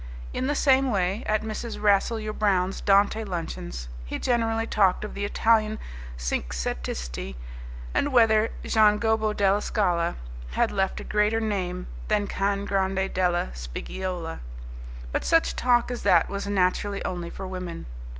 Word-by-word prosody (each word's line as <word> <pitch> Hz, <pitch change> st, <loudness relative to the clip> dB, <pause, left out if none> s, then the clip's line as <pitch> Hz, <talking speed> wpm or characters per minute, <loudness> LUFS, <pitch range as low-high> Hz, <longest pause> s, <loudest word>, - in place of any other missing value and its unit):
In 260 Hz, -, -1 dB
the 290 Hz, -, +1 dB
same 270 Hz, -2 st, +4 dB
way, 195 Hz, +1 st, 0 dB
at 215 Hz, 0 st, +1 dB
Mrs. 220 Hz, +1 st, -5 dB
Rasselyer 215 Hz, +1 st, +2 dB
Brown's 195 Hz, -3 st, +1 dB
Dante 200 Hz, +2 st, +3 dB
luncheons, 165 Hz, -, -5 dB, 0.2 s
he -, -, -4 dB
generally 225 Hz, -2 st, +1 dB
talked 195 Hz, -4 st, +2 dB
of -, -, -7 dB
the 200 Hz, 0 st, -2 dB
Italian 215 Hz, +1 st, +2 dB, 0.4 s
cinquecentisti -, -, -3 dB, 0.6 s
and 290 Hz, -, +1 dB
whether 225 Hz, -3 st, +5 dB, 0.2 s
Gian 215 Hz, -1 st, +4 dB
Gobbo 220 Hz, -1 st, +1 dB
della 200 Hz, 0 st, +2 dB
Scala 175 Hz, -6 st, 0 dB, 0.4 s
had -, -, +2 dB
left 195 Hz, -1 st, 0 dB
a -, -, -6 dB
greater 210 Hz, +1 st, +1 dB
name 185 Hz, -5 st, -2 dB, 0.2 s
than 210 Hz, -1 st, +2 dB
Can 200 Hz, 0 st, -1 dB
Grande 190 Hz, -1 st, 0 dB
della 175 Hz, -, +1 dB
Spiggiola. 165 Hz, -, -5 dB, 0.7 s
But -, -, -1 dB
such 330 Hz, 0 st, +3 dB
talk 245 Hz, -1 st, +2 dB
as 245 Hz, -, -4 dB
that 170 Hz, -2 st, +4 dB
was 200 Hz, 0 st, -4 dB
naturally 200 Hz, +1 st, 0 dB
only 175 Hz, -2 st, -3 dB
for 190 Hz, -, -7 dB
women. 180 Hz, -2 st, -6 dB
200 Hz, 140 wpm, -26 LUFS, 180-220 Hz, 0.7 s, whether